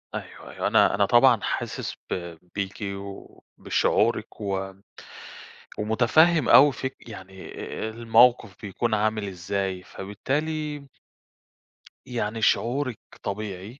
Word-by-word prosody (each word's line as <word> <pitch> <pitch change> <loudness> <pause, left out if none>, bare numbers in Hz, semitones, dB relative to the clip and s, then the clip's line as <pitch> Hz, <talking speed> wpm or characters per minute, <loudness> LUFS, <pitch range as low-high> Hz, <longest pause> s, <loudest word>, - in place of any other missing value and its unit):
أيوه، - - -8
أيوه، - - -2
أنا - - +4
أنا 100 0 +3
طبعًا 120 -1 +5
حاسس - - -3
ب 85 -2 -5 0.2
بيكِ 100 -1 -3
وبشعورِك 100 +3 -2
و 95 -1 -3 1.1
ومتفهّم 125 +8 +3
أوي 145 +1 +8
فك 130 -3 -7
يعني 95 -2 -10
أ - - -6
أ - - -3
الموقف 115 -2 +3
بيكون 110 +3 -2
عامل 110 -1 0
إزاي، 95 0 -3
فبالتالي 145 +8 -4 1.2
يعني 115 -2 -3
شعورِك 125 +1 +1 0.2
طبيعي، 100 +4 -5
110 Hz, 105 wpm, -25 LUFS, 100-125 Hz, 1.2 s, أوي